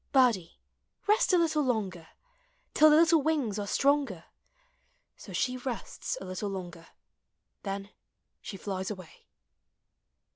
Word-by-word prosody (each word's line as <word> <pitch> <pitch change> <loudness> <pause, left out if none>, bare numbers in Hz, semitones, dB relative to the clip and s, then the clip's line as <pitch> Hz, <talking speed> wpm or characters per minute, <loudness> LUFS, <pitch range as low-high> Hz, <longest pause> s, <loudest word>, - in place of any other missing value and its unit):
Birdie, 235 -11 +3 0.5
rest 430 +3 +3
a 365 - +5
little 320 -3 +2
longer, 200 - -2 0.7
Till 310 - +7
the 300 - +6
little 325 0 +5
wings 275 -9 0
are 205 - -3
stronger. 280 +5 +1 0.9
So - - -12
she 255 -1 0
rests 250 -4 -4
a - - -8
little 185 +2 -4
longer, 175 -4 -7 0.7
Then 195 0 -5 0.5
she 195 - -7
flies 190 -1 -4
away. 185 -6 -10
220 Hz, 120 wpm, -29 LUFS, 190-295 Hz, 0.9 s, Till